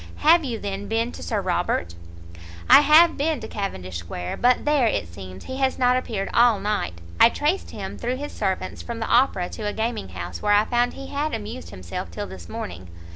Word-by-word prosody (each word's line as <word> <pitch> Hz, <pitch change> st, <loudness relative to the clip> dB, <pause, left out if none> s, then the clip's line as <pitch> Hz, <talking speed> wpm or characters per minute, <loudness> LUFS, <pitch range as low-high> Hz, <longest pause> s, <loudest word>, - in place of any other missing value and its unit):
"Have 330 Hz, +2 st, +7 dB
you, 245 Hz, -5 st, -3 dB
then, 200 Hz, -1 st, -5 dB
been 225 Hz, +3 st, 0 dB
to -, -, -10 dB
Sir 215 Hz, -3 st, -1 dB
Robert?" 175 Hz, -, -1 dB, 0.7 s
"I -, -, +9 dB
have 315 Hz, +3 st, +6 dB
been 300 Hz, 0 st, 0 dB
to -, -, -6 dB
Cavendish 95 Hz, -, -4 dB
Square, 90 Hz, +1 st, -5 dB
but 250 Hz, +1 st, +3 dB
there, 295 Hz, -5 st, +3 dB
it 150 Hz, -, -1 dB
seems, 95 Hz, +1 st, -10 dB
he 260 Hz, -, -6 dB
has 265 Hz, -1 st, +1 dB
not 250 Hz, 0 st, +3 dB
appeared 220 Hz, -6 st, -2 dB
all 235 Hz, -3 st, +5 dB
night; 200 Hz, -, -2 dB, 0.2 s
I -, -, +8 dB
traced 300 Hz, +10 st, -1 dB
him, -, -, -7 dB
through 245 Hz, +2 st, -1 dB
his 290 Hz, +2 st, -6 dB
servants, 190 Hz, -1 st, -3 dB
from 235 Hz, -1 st, -6 dB
the 225 Hz, -, -2 dB
Opera 235 Hz, -8 st, +3 dB
to 215 Hz, -2 st, -5 dB
a -, -, -4 dB
gaminghouse, 95 Hz, -, -4 dB
where 205 Hz, -, +3 dB
I 205 Hz, +1 st, +5 dB
found 245 Hz, +1 st, +1 dB
he 275 Hz, -, -9 dB
had 290 Hz, -1 st, -1 dB
amused 145 Hz, -, -7 dB
himself 85 Hz, -1 st, -6 dB
till 85 Hz, -, -5 dB
this 90 Hz, -3 st, -11 dB
morning." 90 Hz, 0 st, -7 dB
215 Hz, 205 wpm, -24 LUFS, -, 0.7 s, I